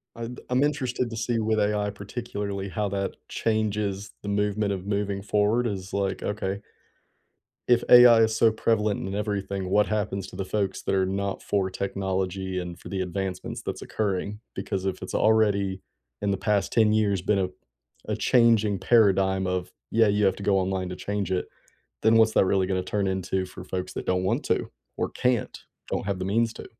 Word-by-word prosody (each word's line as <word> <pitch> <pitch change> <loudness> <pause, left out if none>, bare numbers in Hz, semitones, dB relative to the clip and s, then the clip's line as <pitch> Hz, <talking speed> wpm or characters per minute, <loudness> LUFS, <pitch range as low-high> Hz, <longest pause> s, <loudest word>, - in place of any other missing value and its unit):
I'm 115 +1 -6
b - - -13
I'm 125 +2 +3
interested 130 -4 -1
to 115 - -6
see 115 +1 0
with 110 0 +1
AI, 105 0 +1
particularly, 100 -2 -5
how 105 +1 -2
that 100 0 -2
changes 105 -3 -1
the 105 - -5
movement 105 0 0
of 95 -1 -5
moving 100 -1 -1
forward 105 +4 +1
is 95 -3 -5
like, 100 -1 -1
okay 100 -1 -2 1.1
if 120 -1 +4
AI 120 -2 +9
is 110 0 +3
so 115 0 +5
prevalent 110 -3 0
in 95 - -4
everything, 100 -2 -2
what 105 +1 +3
happens 105 -2 -2
to - - -11
the 95 0 -3
folks 100 -1 -1
that 100 - 0
are 95 -1 +2
not 100 +1 -3
for 95 -2 0
technology 95 -1 -2
and 90 -1 -6
for - - -10
the 95 -2 -2
advancements 95 0 -4
that's - - -5
occurring? 105 0 -2 0.2
Because 95 -2 -3
if 95 -1 -2
it's 90 - -6
already, 100 -3 +2 0.4
in 100 - +1
the 100 - 0
past 100 -1 0
10 110 -2 +4
years 100 -3 +2
been 100 +2 +1
a 95 - +1 0.6
a - - -1
changing 115 -5 +3
paradigm 95 -3 +3
of, 90 -1 -2 0.2
"Yeah, 115 -1 +4
you 105 0 +2
have 95 - +3
to 100 - -7
go 100 0 +3
online 95 -1 -1
to 90 - -5
change 100 0 -3
it," 90 - -1 0.6
then 110 +1 +5
what's 110 -1 +5
that - - +5
really 95 0 +2
gonna 95 -1 0
turn 100 +2 -1
into 95 0 -1
for 90 - -10
folks 95 0 -4
that - - -4
don't 90 0 +1
want 95 - 0
to, - - 0 0.3
or - - -1
can't, 125 -3 0 0.3
or - - -1
have 100 -2 -1
the 95 - -3
means 115 +3 +1
to? - - -9
100 Hz, 195 wpm, -26 LUFS, 95-110 Hz, 1.1 s, AI